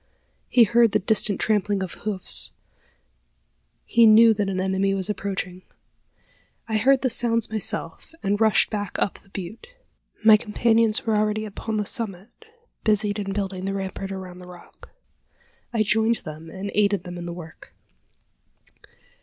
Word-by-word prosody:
He 245 - +6
heard 235 0 +3
the - - +5
distant 210 0 +1
trampling 205 -2 0
of 185 - -6
hoofs: 205 -3 -1 1.3
he 235 -1 +5
knew 225 +1 +7
that 205 -2 -2
an 185 -1 -2
enemy 190 +1 0
was 195 +1 -1
approaching. 190 -3 -4 1.1
I 220 -1 0
heard 265 +5 +3
the 255 - +1
sounds 230 -1 +2
myself, 215 -2 -3
and 205 +2 0
rushed 220 -2 +3
back 205 -3 -4
up 200 - -1
the 195 - -25
butte. 210 - -9 0.5
My 220 -1 +9
companions 225 +1 +1
were 220 -2 +1
already 215 +1 0
upon 215 +1 -5
the 210 - -1
summit, 210 -3 -4 0.5
busied 210 -1 +1
in 195 -1 -3
building 195 -2 -3
the 195 0 -2
rampart 195 0 -5
around 185 -2 -8
the 180 - -12
rock. 175 -1 -15 0.8
I 225 -3 +1
joined 220 +2 +1
them, 155 +1 -9
and 195 +4 -6
aided 200 -3 +2
them 175 0 -8
in 175 - -6
the - - -4
work. 165 -1 -12
205 Hz, 155 wpm, -23 LUFS, 190-220 Hz, 1.3 s, My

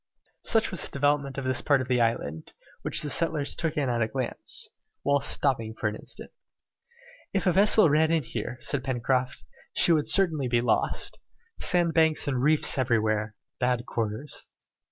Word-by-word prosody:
Such 225 -1 +2
was 185 - -3
the - - -5
development 140 -1 0
of 135 - -3
this 130 -1 0
part 140 -2 +3
of 130 - -3
the 125 -2 +2
island, 80 -9 -2 0.3
which - - +1
the 150 - -3
settlers 160 -4 +1
took 165 -3 -2
in 145 -2 +1
at 120 -1 0
a 110 - +2
glance, 130 +1 -4 0.4
whilst 140 0 +1
stopping 115 -6 0
for 110 - -2
an 105 - -6
instant. - - -8 1.0
"If 195 - 0
a 185 - +4
vessel 200 +1 +4
ran 155 +1 +3
in 165 -2 +1
here," 120 - -5
said 140 -3 -2
Pencroft, 130 0 -1 0.3
"she - - +4
would 155 -3 +2
certainly 160 -9 +2
be 120 -1 +2
lost. 120 -2 0 0.4
Sandbanks 165 -3 +2
and 130 -3 0
reefs 150 0 +3
everywhere! 110 -3 0 0.2
Bad 125 -1 0
quarters!" 115 +5 -4
135 Hz, 170 wpm, -27 LUFS, 120-155 Hz, 1.0 s, a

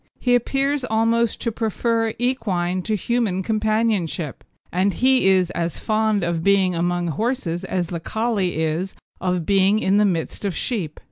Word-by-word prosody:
He 245 - +2
appears 270 +3 +1
almost 230 0 +1
to 230 - -1
prefer 225 +1 0
equine 195 -8 -1
to 215 - 0
human 210 -3 0
companionship, 215 - -1 0.3
and 185 +2 +1
he 260 -4 +3
is 185 -2 +3
as 170 -1 -2
fond 215 -2 +1
of 170 -1 -1
being 195 -1 +3
among 175 0 0
horses 200 - -2
as 185 -2 -1
the 170 - -3
Collie 215 -1 -1
is 165 +5 -2 0.2
of 180 -2 -1
being 195 +2 +3
in 200 -2 +2
the 210 - +4
midst 175 -2 -2
of 200 -3 -2
sheep. 185 - -3
200 Hz, 155 wpm, -22 LUFS, 175-230 Hz, 0.3 s, the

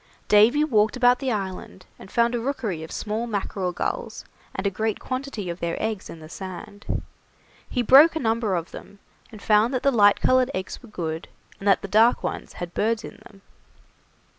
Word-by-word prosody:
Davy 225 +8 +5
walked 220 -5 +2
about 250 0 +4
the 265 -2 -1
island, 190 -3 -5
and - - -12
found 235 +2 +2
a 240 - 0
rookery 230 - -3
of 160 - -8
small 220 +2 -3
mackerel 195 -3 -2
gulls 485 - -4 0.3
and 190 - -4
a 200 - +2
great 220 +2 -1
quantity 255 -6 -5
of 170 +1 -5
their 170 0 -3
eggs 220 -3 -3
in 165 - -9
the 155 - -11
sand. 190 +4 -6 0.7
He 245 - -1
broke 285 +8 +7
a - - 0
number 225 -5 0
of 170 -1 -4
them, 200 - -11 0.3
and 215 -2 -12
found 220 +4 +3
that 250 - -2
the 275 - +4
light 205 -4 +5
coloured 255 0 +3
eggs 185 0 -5
were 245 - -14
good, 165 -5 -4 0.3
and 195 - -5
that 195 - +4
the - - -4
dark 220 +5 +4
ones - - -4
had 175 -1 -7
birds 225 +1 0
in - - -10
them. 195 -2 -20
215 Hz, 195 wpm, -24 LUFS, 190-245 Hz, 0.7 s, broke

